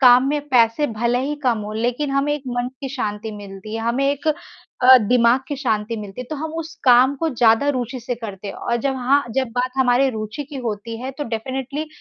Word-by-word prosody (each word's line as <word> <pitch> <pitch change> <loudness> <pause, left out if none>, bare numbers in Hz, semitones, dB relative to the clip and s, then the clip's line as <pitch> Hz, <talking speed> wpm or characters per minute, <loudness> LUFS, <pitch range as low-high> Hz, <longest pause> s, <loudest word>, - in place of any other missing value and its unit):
काम 255 0 +7
में 295 0 0
पैसे 240 +3 +3
भले 235 +1 0
ही 295 - -2
कम 235 -3 +2
हों, 210 0 -6
लेकिन 245 +5 -1
हमें 275 +2 +1
एक 295 - -6
मन 245 0 -1
की 270 - -4
शांति 215 -3 -3
मिलती 200 +1 -9
है, 225 - -2
हमें 235 +4 0
एक 285 +2 -5 0.6
अ, 255 +1 +10
दिमाग 240 +2 +3
की 285 - -3
शांति 225 -4 -1
मिलती 205 +2 -7
है। - - -5
तो 305 - -3
हम 315 +2 -5
उस 320 0 -8
काम 255 +2 +6
को 325 +4 -1
ज़्यादा 230 +4 +4
रूचि 255 -2 -2
से 240 +1 -3
करते 205 -4 -7
हैं, - - -6
और 235 - -1
जब 265 +3 -1
हाँ, 265 +2 +2
जब 265 -2 +1
बात 255 +1 +1
हमारी 260 +1 +3
रुचि 220 +6 -5
की 285 - -6
होती 225 +2 -5
है, 265 - -3
तो 290 +2 -5
डेफ़िनेटली 265 +6 -4
245 Hz, 225 wpm, -21 LUFS, 225-275 Hz, 0.6 s, अ